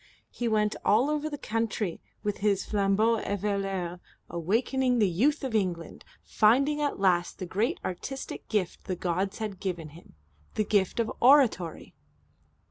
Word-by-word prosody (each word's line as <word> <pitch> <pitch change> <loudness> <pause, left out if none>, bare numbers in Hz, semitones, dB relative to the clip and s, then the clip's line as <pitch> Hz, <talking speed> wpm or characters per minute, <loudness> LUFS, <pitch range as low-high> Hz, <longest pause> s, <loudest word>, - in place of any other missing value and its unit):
He 240 - -3
went 215 -1 +1
all 245 +8 +3
over 300 0 -1
the 290 - -5
country 220 -7 -2 0.2
with 205 -1 -1
his 200 -2 +1
flambeau 210 +3 +2
eveilleur, 195 -3 -2 0.3
awakening 245 +9 +1
the 210 -3 +4
Youth 240 - +1
of 260 -4 -3
England, 180 -6 -2 0.2
finding 275 +8 +3
at 290 -7 -1
last 180 -3 +2
the 185 - -5
great 205 +7 -1
artistic 270 +9 -5
gift 200 -5 -1
the 185 - -2
gods 185 +3 -2
had 210 -4 -5
given 175 -5 -4
him, 160 - -16 0.4
the 215 - +1
gift 200 +1 +1
of 230 - 0
oratory. 245 - +3
205 Hz, 145 wpm, -28 LUFS, 185-235 Hz, 0.4 s, the